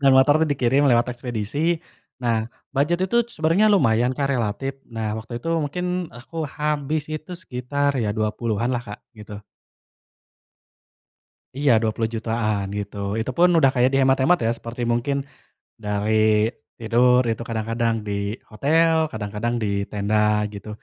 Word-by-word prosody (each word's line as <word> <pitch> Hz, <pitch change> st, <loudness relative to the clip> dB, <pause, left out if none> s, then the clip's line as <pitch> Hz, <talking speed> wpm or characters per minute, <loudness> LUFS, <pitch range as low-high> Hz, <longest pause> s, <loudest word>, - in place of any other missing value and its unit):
Dan 140 Hz, -1 st, +5 dB
motor 145 Hz, +4 st, +5 dB
tuh 160 Hz, -, +2 dB
dikirim 140 Hz, 0 st, +2 dB
lewat 120 Hz, 0 st, +3 dB
ekspedisi, 125 Hz, +7 st, -1 dB, 0.4 s
nah, 115 Hz, -2 st, -1 dB, 0.2 s
bujet 170 Hz, +6 st, +1 dB
itu 190 Hz, +5 st, -1 dB
sebenarnya 170 Hz, +2 st, +2 dB
lumayan, 125 Hz, -, +3 dB
Kak, 140 Hz, -, 0 dB
relatif. 130 Hz, +3 st, -2 dB
Nah, 110 Hz, -2 st, -3 dB
waktu 115 Hz, +2 st, -7 dB
itu 165 Hz, -, -5 dB
mungkin 150 Hz, +4 st, -3 dB, 0.3 s
aku 155 Hz, +5 st, -5 dB
habis 150 Hz, +1 st, -2 dB
itu 155 Hz, +3 st, -6 dB
sekitar 140 Hz, -3 st, -2 dB
ya 110 Hz, -, 0 dB
20-an 110 Hz, +2 st, -1 dB
lah, 120 Hz, -, 0 dB
Kak, 105 Hz, -, -7 dB
gitu. 105 Hz, -2 st, -10 dB, 2.2 s
Iya 145 Hz, -1 st, +2 dB
Rp20.000.000-an, 110 Hz, -1 st, -1 dB
gitu. 100 Hz, 0 st, -6 dB, 0.2 s
Itupun 130 Hz, +10 st, +2 dB
udah 135 Hz, -3 st, +5 dB
kayak 125 Hz, 0 st, +3 dB
dihemat-hemat 135 Hz, +5 st, +3 dB
ya, -, -, +2 dB
seperti 115 Hz, +1 st, -6 dB
mungkin, 120 Hz, +4 st, 0 dB, 0.7 s
dari 105 Hz, +1 st, 0 dB, 0.6 s
tidur 125 Hz, +2 st, +4 dB
itu 115 Hz, +1 st, -3 dB
kadang 110 Hz, -2 st, -3 dB
kadang 115 Hz, 0 st, +1 dB
di 105 Hz, -, -2 dB, 0.4 s
hotel, 160 Hz, +9 st, +3 dB, 0.2 s
kadang-kadang 110 Hz, +2 st, -3 dB
di -, -, 0 dB, 0.2 s
tenda, 105 Hz, +1 st, -1 dB, 0.4 s
gitu. 100 Hz, +1 st, -9 dB
125 Hz, 135 wpm, -23 LUFS, 110-145 Hz, 2.2 s, Dan